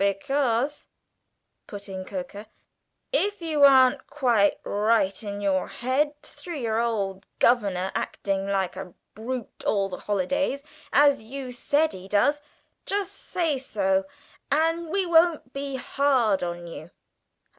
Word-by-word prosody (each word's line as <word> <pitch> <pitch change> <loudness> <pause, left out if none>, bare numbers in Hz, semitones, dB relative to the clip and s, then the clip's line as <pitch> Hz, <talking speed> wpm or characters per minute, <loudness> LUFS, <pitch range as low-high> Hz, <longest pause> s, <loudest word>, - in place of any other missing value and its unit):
"Because," 260 +6 0 0.8
put 205 -1 -8
in 190 -1 -6
Coker, 225 -4 -7 0.7
"if 410 -4 +1
you 320 -4 -1
aren't 260 -2 +6
quite 240 -8 +2
right 210 -1 +1
in 205 -1 -5
your 190 -2 +1
head, 290 +4 -1
through 345 -3 -8
your 225 -4 -1
old 200 -4 -2
governor 195 -6 +2
acting 195 -1 -2
like 195 -2 -1
a 185 -2 -8 0.2
brute 235 +2 -6
all 195 -2 +1
the 185 - -6
holidays, 275 +8 -1 0.3
as 285 -2 +5
you 255 +3 -7
said 290 +5 +1
he 185 0 -9
does, 250 +9 +2 0.5
just 400 -1 -1
say 325 -6 -2
so, 195 -6 0 0.5
and 325 +3 +1
we 385 +3 0
won't 330 -6 +3
be 275 0 -4
hard 255 -5 +1
on 175 -1 -4
you." 165 -1 -9
240 Hz, 130 wpm, -25 LUFS, 200-285 Hz, 0.8 s, aren't